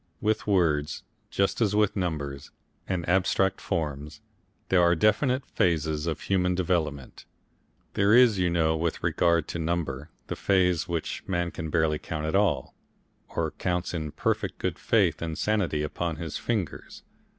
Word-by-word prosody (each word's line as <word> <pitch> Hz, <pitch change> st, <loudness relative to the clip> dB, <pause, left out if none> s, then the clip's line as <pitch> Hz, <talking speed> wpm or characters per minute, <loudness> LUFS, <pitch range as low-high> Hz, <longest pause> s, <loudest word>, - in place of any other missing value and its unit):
With 110 Hz, +1 st, 0 dB
words 80 Hz, -7 st, +1 dB, 0.3 s
just 100 Hz, +4 st, 0 dB
as 105 Hz, -2 st, +2 dB
with 105 Hz, -1 st, +2 dB
numbers 75 Hz, -7 st, -3 dB, 0.4 s
and 90 Hz, -3 st, -2 dB
abstract 95 Hz, +1 st, +2 dB
forms 75 Hz, -4 st, -3 dB, 0.5 s
there 90 Hz, -2 st, +4 dB
are 85 Hz, 0 st, +4 dB
definite 125 Hz, -, +2 dB
phases 80 Hz, -2 st, 0 dB
of 80 Hz, -2 st, -2 dB
human 90 Hz, -2 st, +1 dB
development. 80 Hz, -7 st, -2 dB, 0.7 s
There 100 Hz, +1 st, +3 dB
is, 120 Hz, -5 st, +6 dB
you 90 Hz, -1 st, +2 dB
know, 80 Hz, -2 st, +2 dB
with 80 Hz, +1 st, -2 dB
regard 85 Hz, -1 st, +2 dB
to 85 Hz, -, -4 dB
number, 80 Hz, -4 st, -2 dB, 0.2 s
the -, -, -4 dB
phase 90 Hz, -4 st, +2 dB
when 85 Hz, -2 st, -1 dB, 0.2 s
man 85 Hz, -2 st, -1 dB
can 80 Hz, -, -5 dB
barely 80 Hz, -2 st, +1 dB
count 80 Hz, -1 st, -4 dB
at 80 Hz, -, -1 dB
all, 95 Hz, -10 st, +1 dB, 0.6 s
or -, -, -2 dB
counts 90 Hz, -1 st, -2 dB
in 80 Hz, -3 st, -3 dB
perfect -, -, -1 dB
good -, -, -3 dB
faith -, -, +2 dB
and 80 Hz, -1 st, -3 dB
sanity 100 Hz, -8 st, 0 dB
upon 85 Hz, +2 st, -3 dB
his 80 Hz, -1 st, -6 dB
fingers. 110 Hz, -8 st, -3 dB
85 Hz, 150 wpm, -27 LUFS, 80-95 Hz, 0.7 s, is